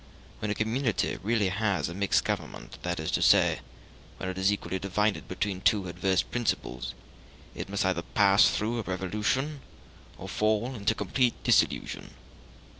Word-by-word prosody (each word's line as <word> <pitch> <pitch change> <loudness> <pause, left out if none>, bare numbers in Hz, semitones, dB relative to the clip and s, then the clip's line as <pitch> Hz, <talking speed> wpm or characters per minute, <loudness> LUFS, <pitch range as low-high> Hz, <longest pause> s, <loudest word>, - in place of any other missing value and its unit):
When 105 - -3
a 105 - 0
community 110 +1 0
really 105 -1 +1
has 100 0 0
a 85 - -5
mixed 100 +2 +2
government, - - -4
that 90 +1 -2
is 80 - -2
to - - +1
say, - - +5 0.6
when 95 - -4
it 95 - -5
is 95 +2 +3
equally 95 -2 -3
divided 105 +2 0
between 95 0 -3
two 100 -3 +2
adverse 90 +1 +1
principles, 105 - -3 0.6
it - - -6
must 100 -1 0
either 90 -2 +1
pass 100 +3 +4
through 115 +3 -1
a - - 0
revolution 105 +10 -2 0.6
or - - -8
fall 110 +4 0
into 105 -5 0
complete 120 +5 +1
dissolution. - - +1
100 Hz, 155 wpm, -28 LUFS, 95-110 Hz, 0.6 s, say